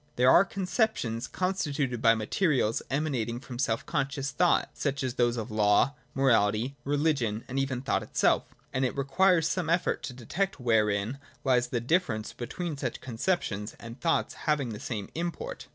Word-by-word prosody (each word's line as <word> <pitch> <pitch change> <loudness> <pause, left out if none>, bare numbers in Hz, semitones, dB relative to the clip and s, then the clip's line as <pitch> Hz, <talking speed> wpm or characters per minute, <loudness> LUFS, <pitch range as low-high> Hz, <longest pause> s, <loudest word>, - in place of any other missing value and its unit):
There 125 +1 +5
are 175 - +7
concep 195 +3 0
tions 115 0 -3
constituted 145 -10 -1
by 115 0 +6
materials 115 - +1
emanating 130 -5 -1
from 125 -1 -9
self 115 -3 0
con 140 -4 0
scious 140 0 -4
thought, 175 +3 +2
such 140 -1 -2
as 130 -2 -1
those 120 -1 +1
of 115 0 -4
law, 105 +5 +3 0.2
morality, 120 -1 +2
religion, 140 -7 0
and 135 +2 -2
even 135 -1 -1
of 125 - -7
thought - - +1
itself, - - +2 0.3
and 130 - 0
it 130 - -1
requires 160 +5 +3
some 180 -1 -1
effort 170 +1 +1
to 125 - -5
detect 145 - -2
wherein 110 0 +1 0.2
lies 125 -2 +3
the 125 -1 -1
difference 115 -6 0
between 145 +7 -4
such 125 -4 -3
con 120 -3 -8
ceptions 115 - -1
and 115 +2 -10
thoughts 165 -1 +1 0.2
having 145 -5 +1
the 105 -2 -6
same 105 -4 -4
import. 175 - -4
130 Hz, 175 wpm, -28 LUFS, 115-155 Hz, 0.3 s, are